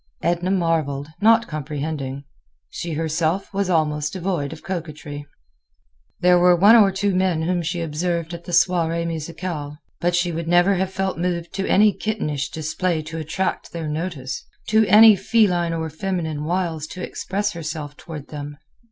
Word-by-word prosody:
Edna 175 +1 0
marveled, 160 -6 0
not 230 +2 +5
comprehending. 145 -2 -4 0.5
She 170 -1 -4
herself 160 +5 -1
was 195 -1 0
almost 150 -3 +1
devoid 175 -6 -2
of 160 - -10
coquetry. 150 -5 -6 0.9
There 180 0 +5
were 180 0 +6
one 200 +6 +7
or 210 -4 +7
two 195 +1 0
men 185 -3 +1
whom 175 +1 0
she 170 +1 -2
observed 170 +1 -2
at 170 0 -8
the 175 - -7
soirée 170 -1 +2
musicale; 160 -2 -5 0.2
but 175 0 +1
she 180 0 +1
would 165 0 -4
never 175 +3 +4
have 190 0 0
felt 190 -3 -2
moved 175 -1 -2
to 195 0 -2
any 210 +1 +5
kittenish 150 -12 -2
display 160 +1 -2
to 165 +1 -6
attract 160 +5 -3
their 165 -2 -4
notice—to 160 +7 -2
any 215 0 +8
feline 190 -4 +2
or 165 -1 -2
feminine 160 -3 -3
wiles 165 -3 -1
to 185 +2 -7
express 205 +2 -2
herself 155 -4 -6
toward 150 -3 -9
them. 145 -1 -7
170 Hz, 155 wpm, -22 LUFS, 155-185 Hz, 0.9 s, any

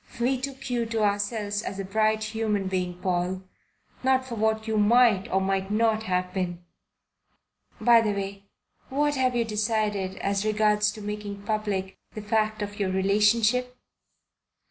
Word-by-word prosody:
"We 250 +2 +1
took 275 -1 -5
you 235 -2 0
to 225 -1 -1
ourselves 205 0 -1
as 195 - -5
a 195 - -4
bright 215 +2 +1
human 215 -3 -1
being, 180 -2 -2
Paul 180 +1 -1 0.6
not 260 0 +2
for 255 - -7
what 220 0 0
you 220 -1 +1
might 215 -2 +4
or 190 - +3
might 195 0 -1
not 220 +1 +2
have 180 0 -1
been. 175 -2 -3 1.1
By 235 -1 +6
the 215 -2 0
way, 200 0 -6 0.4
what 290 +2 +1
have 255 -2 +1
you 235 -1 +1
decided 210 -3 -1
as 200 0 -1
regards 210 0 +2
making 210 -1 -6
public 205 -3 -2 0.2
the 215 - -5
fact 215 0 0
of 205 +1 -7
your 195 -2 0
relationship?" 215 +6 +2
210 Hz, 150 wpm, -26 LUFS, 195-225 Hz, 1.1 s, By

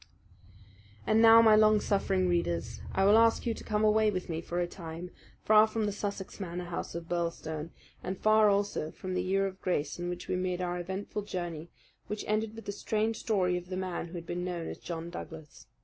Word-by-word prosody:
And 220 +1 +4
now, 230 0 +9
my 220 -1 +7
long 215 0 +5
suffering 195 -2 +1
readers, 110 - -1
I 195 - +2
will 210 +3 +7
ask 230 0 +3
you 235 - +1
to - - -10
come 215 -1 0
away 215 0 +4
with 185 -3 -3
me 165 0 -2
for 175 +1 -3
a 175 - +1
time, 175 0 -8 0.3
far 215 0 +6
from 220 0 -1
the 205 - 0
Sussex 200 -1 -5
Manor 180 -2 -4
House 175 -1 -5
of 170 -1 -6
Birlstone, 165 -2 -3 0.3
and 190 - -3
far 215 +1 +5
also 200 -6 0
from 185 +3 -6
the 180 - 0
year 195 +2 +1
of 190 -1 -6
grace 155 -4 -1
in 175 0 -3
which 180 0 -6
we - - -1
made 180 -1 -1
our 180 -1 -2
eventful 190 +4 -4
journey 175 -5 -5 0.4
which 210 0 -4
ended 215 +1 -1
with 225 - -10
the - - -3
strange 220 +2 -1
story 185 -5 +1
of 180 0 -8
the 185 - -3
man 185 -2 -3
who 170 - -13
had 170 -1 -6
been 175 +1 -3
known 175 -2 -3
as - - -7
John 170 0 -6
Douglas. 160 -7 -9
185 Hz, 215 wpm, -30 LUFS, 175-210 Hz, 0.4 s, now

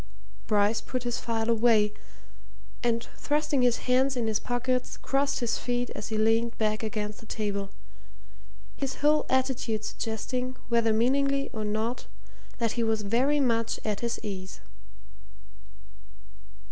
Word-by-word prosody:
Bryce 210 0 +3
put 255 -1 -4
his 240 -1 -1
file 225 -1 -1
away, 220 -2 +4 0.9
and 235 0 0
thrusting 295 -2 +1
his 245 -1 +2
hands 260 +1 +3
in 235 - 0
his 220 -1 +1
pockets, 250 +1 -1
crossed 275 0 0
his 235 -1 0
feet 245 0 -1
as - - -5
he 220 - -2
leaned 225 +2 +2
back 215 -1 0
against 210 -1 -3
the 225 - -14
table 200 -3 -2 1.1
his 275 -2 -3
whole 300 +1 +4
attitude 255 -4 0
suggesting, 250 +3 -3
whether 230 -1 +3
meaningly 275 +5 +2
or 220 - -3
not, 215 +3 -2 0.5
that 230 -3 +1
he 235 - -1
was 220 -1 +1
very 255 +8 +2
much 230 -4 +1
at 210 -2 -1
his 235 0 -2
ease. 190 - -5
230 Hz, 135 wpm, -28 LUFS, 215-255 Hz, 1.1 s, away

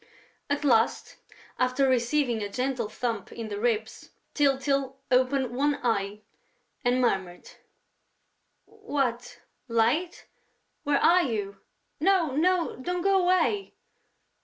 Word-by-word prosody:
At 285 +1 -1
last, 235 -5 +1 0.4
after 255 +2 +2
receiving 245 -1 +1
a 205 - -3
gentle 250 0 -2
thump 230 -3 -4
in 225 -2 -7
the 205 -1 -4
ribs, 220 -1 -2 0.2
Tyltyl 275 -1 +1
opened 255 -1 +2
one 290 +2 +1
eye 205 -3 -1 0.6
and 245 0 +2
murmured: 190 -7 -1 1.1
"What?... 275 - -3 0.3
Light?... 245 +10 0 0.6
Where 290 -1 +1
are 355 +5 +5
you?... 210 - -3 0.4
No, 360 -8 +2
no, 350 +2 +1
don't 355 +6 -3
go 390 -1 +3
away...." 370 +3 +1
255 Hz, 110 wpm, -27 LUFS, 230-300 Hz, 1.1 s, are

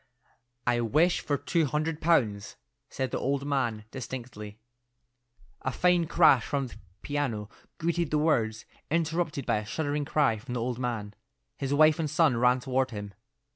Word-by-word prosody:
"I 120 -1 +2
wish 155 +10 +3
for 145 - -1
two 155 +3 0
hundred 150 +2 -2
pounds," 115 -12 +1 0.3
said 130 -1 -3
the - - -1
old 140 +1 -1
man 120 -7 -1
distinctly. 120 -5 -7 1.0
A 130 - -1
fine 175 +3 +2
crash 155 -8 +5
from 140 -1 -1
the 125 - -10 0.3
piano 125 -8 -2 0.3
greeted 170 -1 0
the 150 - +1
words, 115 -8 +1 0.2
interrupted 160 -3 -1
by - - +1
a 105 - -4
shuddering 145 +1 -2
cry 140 -7 +2
from 125 +3 -6
the - - -1
old 125 0 -2
man. 115 -5 -3 0.4
His 135 -1 -4
wife 155 +2 +5
and 155 -2 -1
son 145 -6 +3
ran 125 +1 +4
toward 130 0 0
him. 105 -3 -7
135 Hz, 160 wpm, -28 LUFS, 120-155 Hz, 1.0 s, crash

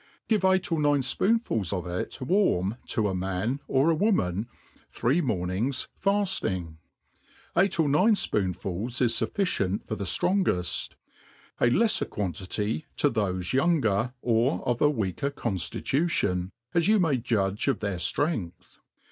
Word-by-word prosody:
(Jive 190 -3 +4
eight 185 -1 -3
or 165 - +1
nine 145 -1 +3
fpoonfuls 130 - +1
of 90 -2 -2
it 90 +1 -4
warm 125 - +1
to 110 -2 0
a 95 - -1
man, 95 +8 -2
or 140 +5 +3
a - - +2
woman, 115 - +1 0.4
three 140 +9 +1
mornings 110 - -1
faf^iag. 185 - 0 0.8
Eight 190 0 +2
or 160 - +4
nine 185 +10 +4
fpoonfuU 100 - -2
is 120 -2 +3
lufficient 100 - -1
for - - -3
the 100 - -4
ftrongeft 95 - +1
j - - -27 0.6
a 120 - +4
leffer 220 - +2
quantity 105 - -3
to 145 - +2
thofe 95 -5 -1
younger, 130 - +1
or 120 +4 +1
of 120 -1 0
a 145 - +5
weaker 110 - -1
conAitution, 115 - -1 0.2
as 170 0 +2
you 215 +1 +5
may 160 -7 +2
judge 105 -4 -1
of 135 -5 +2
their 100 -3 -2
flrength. 90 - -2
120 Hz, 140 wpm, -27 LUFS, -, 0.8 s, a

